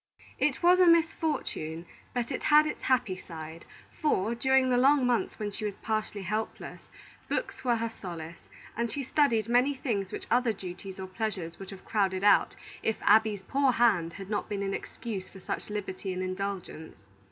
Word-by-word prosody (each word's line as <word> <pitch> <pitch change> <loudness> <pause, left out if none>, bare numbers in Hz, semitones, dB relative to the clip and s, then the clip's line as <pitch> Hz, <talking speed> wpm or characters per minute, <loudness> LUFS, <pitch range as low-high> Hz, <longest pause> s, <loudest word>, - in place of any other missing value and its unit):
It 300 +3 +1
was 360 +1 +6
a 365 - +6
misfortune, 315 - +1 0.3
but 245 +1 -2
it 260 - -3
had 300 +1 +6
its 305 - -4
happy 250 -7 +1
side; 160 -2 -9 0.3
for, 230 - 0
during 265 +1 +3
the 245 - +4
long 275 +1 +5
months 245 -2 0
when 210 -2 -3
she 215 - -6
was 205 -2 -2
partially 215 -2 -3
helpless, 215 +4 -4 0.4
books - - -3
were 245 -2 +3
her 230 0 -1
solace, 170 -5 -8 0.3
and 235 +1 -1
she 280 +4 -3
studied 235 -6 +2
many 250 +4 +3
things 205 -8 -2
which - - -6
other 245 -1 +3
duties 190 0 -8
or 190 - -4
pleasures 185 -4 -4
would 195 -1 -8
have 195 -2 -10
crowded 195 -3 0
out, 205 - +5 0.3
if 220 - 0
"Abby's 210 -2 +4
poor 270 +5 +2
hand" 195 -9 +3
had 195 +1 -8
not 205 - -2
been 200 -1 -2
an 195 0 -2
excuse 200 -3 -5
for 190 - -13
such 185 - -5
liberty 200 -2 -4
and 185 0 -3
indulgence. 185 -3 -5
215 Hz, 180 wpm, -29 LUFS, 190-250 Hz, 0.4 s, was